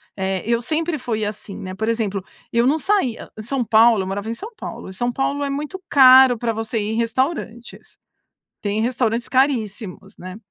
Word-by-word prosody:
Eh, 190 -1 -2
eu 235 +1 +1
sempre 315 +5 -1
fui 225 -4 -2
assim, 205 -1 -6
né, 185 0 -7
por 220 +4 -3
exemplo, 215 -4 -1 0.3
eu 235 +1 +2
não 295 +4 +3
saía 320 - -1
São 245 +4 -2
Paulo, 225 -1 +4
eu - - -6
morava 200 +3 -4
em - - -2
São 425 - -8
Paulo, 190 - -8
São 240 +6 -2
Paulo 275 +3 -1
é 280 - -2
muito 300 +7 -5
caro 260 -2 +7
para 230 +1 -1
você 225 +1 -3
ir 210 +1 -2
em - - -2
restaurantes. 240 0 -3 0.6
Tem 205 +1 -1
restaurantes 235 -2 -1
caríssimos, 230 -7 -1
né, 185 +1 -8
235 Hz, 185 wpm, -21 LUFS, 215-265 Hz, 0.6 s, caro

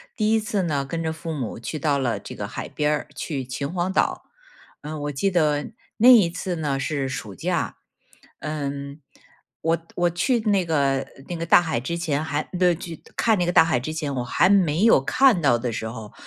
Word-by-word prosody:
第 215 -2 +1
一 225 - +4
次 210 -3 -1
呢 145 -5 -1
跟 165 +4 -4
着 160 -1 -1
父 160 +1 -6
母 130 -8 -4
去 155 +6 -5
到 145 0 +1
了 120 -6 -1
这 - - -9
个 - - -5
海 - - -6
边 150 0 0
儿， 150 - -2
去 140 -5 -3
秦 140 +4 -4
皇 180 +1 -1
岛。 - - 0 0.6
嗯， 150 0 -6
我 145 - -2
记 170 +8 0
得 150 -4 +1 0.3
那 235 +3 +7
一 220 -9 +7
次 180 +1 -4
呢 145 -4 -1
是 135 0 -2
暑 110 -6 -6
假。 90 - -2 0.6
嗯， 140 -1 -5 0.6
我 165 +1 +2 0.2
我 175 0 +2
去 235 +9 +1
那 205 -4 +2
个， 140 -4 +1 0.2
那 175 - -4
个 165 - -3
大 - - +7
海 160 -8 -1
之 170 +8 -3
前 155 -3 -1
还， 150 -1 -1 0.2
呃， 180 -2 +4
去， 165 -2 -8
看 225 -2 +3
那 175 - +2
个 - - +2
大 165 - +7
海 160 -6 +1
之 135 +6 -5
前 150 -3 -3
我 125 - -2
还 120 - +3
没 180 -3 +3
有 225 -11 +6
看 250 - +4
到 135 -6 +4
的 120 0 -3
时 110 0 -4
候， 110 -2 -9
155 Hz, 230 characters per minute, -24 LUFS, 140-175 Hz, 0.6 s, 那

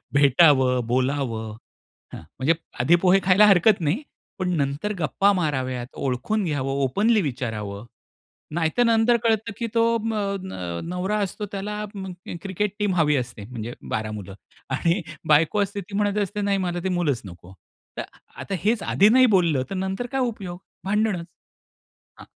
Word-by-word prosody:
भेटावं, 135 -3 +4
बोलावं 120 -3 -1 0.6
हां, - - -8 0.2
म्हणजे 150 +6 +3 0.3
आधी 160 +8 +5
पोहे 190 +1 +5
खायला 195 +3 +6
हरकत 195 +1 +5
नाही. 170 - 0 0.4
पण 185 -1 -1
नंतर 145 +8 -1
गप्पा 185 +7 +2
माराव्यात 130 -8 -1
ओळखून 140 - -1
घ्यावं. 140 -5 -1
ओपनली 210 - +2
विचारावं, 110 - -4 0.7
नाहीतर 170 +8 +1
नंतर 230 +1 +4
कळतं, 220 -2 +1
की 235 - -2
तो 230 - +4 0.2
म 225 0 -2 0.3
न 90 - -5
नवरा 185 +4 -1
असतो, 205 +2 -4
त्याला 210 +1 -4 0.6
क्रिकेट 195 +2 -2
टीम 205 -3 +1
हवी 150 -3 +3
असते, 120 -5 -5
म्हणजे 120 0 -6 0.2
12 110 0 -2
मुलं 100 -2 -7 0.4
आणि 170 +7 +1 0.3
बायको 160 +7 +4
असते, 200 +1 -4
ती 200 +2 -9
म्हणत 205 0 +1
असते, 205 +2 -4
"नाही 200 -1 +1
मला 175 -2 -2
ते 190 - 0
मुलच 170 -9 0
नको." 90 0 -12 0.4
तर - - -2 0.4
आता 195 - -3
हेच 220 0 +1
आधी 205 +3 +4
नाही 255 +2 +6
बोललं 160 -8 +2
तर 195 - -4
नंतर 190 +5 -2
काय 270 -1 0
उपयोग, 195 -7 -3 0.3
भांडणच 210 -3 0 0.9
हां. - - -11
175 Hz, 155 wpm, -24 LUFS, 130-205 Hz, 0.9 s, खायला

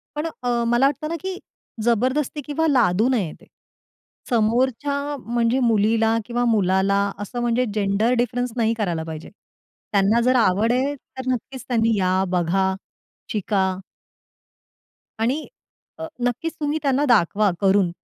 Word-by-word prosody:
पण 300 +2 -2 0.2
अ, 240 -1 +1
मला 240 +3 +3
वाटतं 290 +2 0
ना, 335 - -2
की 375 +1 -4 0.5
जबरदस्ती 255 +6 0
किंवा 320 +2 0
लादू 230 - +3
नये 210 -11 0
ते - - -17 0.8
समोरच्या 260 +5 0
म्हणजे 235 +2 +1
मुलीला 225 0 +2
किंवा 240 +1 -1
मुलाला 195 -3 +2 0.2
असं 205 +4 -5
म्हणजे 240 +1 +1
जेंडर 210 +3 +1
डिफरन्स 245 +1 -1
नाही 225 -1 +2
करायला 175 -7 -1
पाहिजे. 160 -1 -8 0.6
त्यांना 205 +3 +3
जर 255 +2 +3
आवडेल 235 +6 +2 0.2
तर 260 0 -6
नक्कीच 255 +1 -5
त्यांनी 230 -2 +2
या 185 0 +2
बघा, 185 +2 +1 0.6
शिका. 190 -3 0 1.4
आणि 255 +8 -1 0.5
अ, 320 - -5 0.2
नक्कीच 250 +7 -1
तुम्ही 295 +1 0
त्यांना 280 0 +2
दाखवा 210 -2 +3
करून. 195 -2 +3
235 Hz, 130 wpm, -22 LUFS, 200-255 Hz, 1.4 s, मला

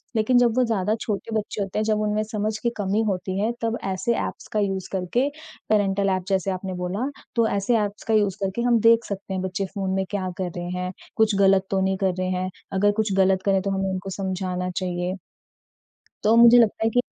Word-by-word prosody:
लेकिन 225 +3 +3
जब 240 -2 +4
वो 255 - +5
ज़्यादा 215 -2 0
छोटे 215 +1 -3
बच्चे 210 -1 -2
होते 195 +2 -2
हैं, - - +1
जब 215 -1 +1
उनमें 210 0 0
समझ 215 0 -2
की 235 - +2
कमी 205 +1 0
होती 190 0 -2
है 215 +3 +1
तब 230 0 -1
ऐसे 195 +5 0
एप्स - - -7
का 215 - +1
यूज़ 195 -2 -1
करके 195 +8 0 0.4
पैरेंटल 200 -2 +2
एप 185 -1 0
जैसे 195 -1 0
आपने 185 0 -4
बोला 180 +8 -2 0.3
तो 230 -1 +3
ऐसे 200 +4 +1
एप्स 205 0 -3
का 225 - +1
यूज़ 205 -3 +2
करके 195 +5 -1
हम 240 -1 +3
देख 230 0 +5
सकते 200 -1 -5
हैं 185 - -2
बच्चे 190 +1 -2
फ़ोन 195 -1 -2
में 190 0 0
क्या 190 -3 -2
कर 185 -2 -2
रहे 175 0 -4
हैं? 180 0 -3 0.2
कुछ 220 -2 +3
गलत 195 -1 +4
तो 190 -1 +1
नहीं 190 0 +1
कर 190 -1 +1
रहे 185 - 0
हैं? 185 0 -1 0.2
अगर 205 +2 +3
कुछ 210 -2 -1
गलत 190 0 +3
करें 195 -1 +3
तो 200 0 -2
हमें 195 0 -1
उनको 190 +1 -4
समझाना 185 -1 -3
चाहिए। 180 0 -2 1.1
तो 220 +2 +4
मुझे 235 +1 +8
लगता 220 -1 +3
है - - +4
कि 245 +2 +1
195 Hz, 225 wpm, -24 LUFS, 190-215 Hz, 1.1 s, मुझे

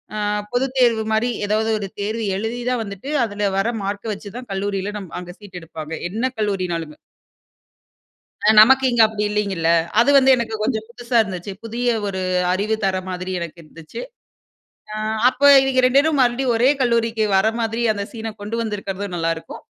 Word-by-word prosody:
அ - - -3 0.4
பொதுத் 260 +2 -1
தேர்வு 235 -3 +3
மாரி, 220 +3 +1 0.2
ஏதாவது 215 +2 0
ஒரு 200 - -4
தேர்வு 220 +3 -2
எழுதி 225 +4 -3
தான் 250 -2 0
வந்துட்டு 200 +5 -8 0.2
அதுல 205 -1 -5
வர்ற 210 +4 +1
மார்க்க 205 +2 -3
வச்சு 205 0 -9
தான் 250 0 -8
கல்லூரியில 195 +1 -2
நம் 190 -4 -10
அங்க 180 0 -9
சீட் 200 -4 -11
எடுப்பாங்க, 160 -1 -8 0.2
என்ன 225 +7 -1
கல்லூரினாலும். 180 -7 -2 1.5
அ - - +6
நமக்கு 265 +4 +5
இங்க 240 -1 +3
அப்படி 215 -1 -3
இல்லிங்கல்ல 200 -6 -1 0.3
அது 240 - +4
வந்து 265 -1 +5
எனக்கு 225 -2 -3
கொஞ்சம் 220 -2 -1
புதுசா 240 0 -2
இருந்துச்சு. 190 -1 -6
புதிய 235 +2 -3 0.2
ஒரு 190 -1 -3 0.3
அறிவு 210 +4 0
தர்ற 190 -1 +1
மாதிரி 185 0 -4
எனக்கு 170 -1 -6
இருந்துச்சு. 155 +1 -11 0.9
அ - - -4 0.3
அப்ப 255 +1 -12 0.2
இவங்க 265 -1 +2
2 255 +2 +5
பேரும் 295 0 +1
மறுபடியும் 245 0 +1
ஒரே 240 +4 +4
கல்லூரிக்கு 230 -2 +1
வர 195 +3 +3
மாதிரி 225 0 -1
அந்த 200 -1 -4
சீன 225 -1 -5
கொண்டு 210 +3 -4
வந்திருக்கறதும் 200 -3 -4
நல்லாருக்கும். 165 -1 -3
215 Hz, 165 wpm, -21 LUFS, 195-235 Hz, 1.5 s, அ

